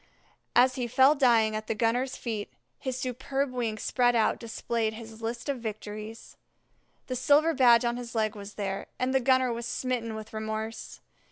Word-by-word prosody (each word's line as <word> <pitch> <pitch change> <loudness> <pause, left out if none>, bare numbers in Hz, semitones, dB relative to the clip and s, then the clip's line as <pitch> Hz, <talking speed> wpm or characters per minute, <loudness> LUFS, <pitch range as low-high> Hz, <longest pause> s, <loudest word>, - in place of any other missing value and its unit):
As 255 +1 +6
he 245 -2 -1
fell 265 +4 +5
dying 235 -6 +3
at 215 0 -4
the - - -1
gunner's 245 +4 0
feet, 220 -4 -4 0.3
his 260 -2 -3
superb 265 +2 -2
wings 230 -4 -3
spread 245 -1 +2
out 225 - +2
displayed 225 -1 -2
his 225 0 -10
list 235 +3 -4
of 280 -3 -1
victories. 215 0 -7 0.7
The 255 - -4
silver 290 +6 +4
badge 245 -3 +5
on 235 0 0
his 240 -1 -7
leg 215 -1 0
was 205 0 -9
there, 195 -1 -3
and 255 +1 0
the 265 - +4
gunner 260 -1 +3
was 235 0 -4
smitten 245 -2 -2
with 220 0 -8
remorse. 220 +1 -5
235 Hz, 175 wpm, -28 LUFS, 220-255 Hz, 0.7 s, As